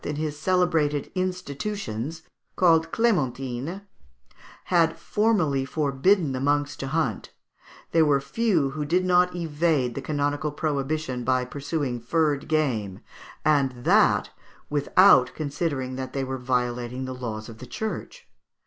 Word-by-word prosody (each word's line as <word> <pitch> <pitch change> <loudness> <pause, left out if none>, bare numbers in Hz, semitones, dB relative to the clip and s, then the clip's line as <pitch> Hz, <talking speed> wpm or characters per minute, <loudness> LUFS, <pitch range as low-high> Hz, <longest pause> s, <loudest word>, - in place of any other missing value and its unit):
in 150 - -3
his 150 0 -3
celebrated 155 -3 +1
"Institutions," 175 - -4 0.3
called 165 -2 +3
"Clémentines," 145 - -1 0.8
had 165 -2 +2
formally 175 -9 +1
forbidden 150 +4 +1
the 130 - -3
monks 145 +1 0
to 135 - -5
hunt, 135 -8 -1 0.6
there 165 - +4
were 145 -2 +3
few 155 0 0
who 150 +2 -3
did 180 +5 +1
not 180 0 +3
evade 155 -6 0
the - - -5
canonical 145 0 -1
prohibition 145 -3 -2
by 130 0 +1
pursuing 140 -1 -3
furred 150 +2 0
game, 120 -12 0 0.5
and 135 -5 +2
that - - +3 0.4
without 145 -2 +5
considering 140 -4 -3
that 130 -1 -5
they 135 - -1
were 130 0 -4
violating 125 0 -2
the 130 - -5
laws 110 -4 -5
of 115 -2 -11
the 125 - -9
Church. 220 - -6
145 Hz, 130 wpm, -25 LUFS, 130-165 Hz, 0.8 s, without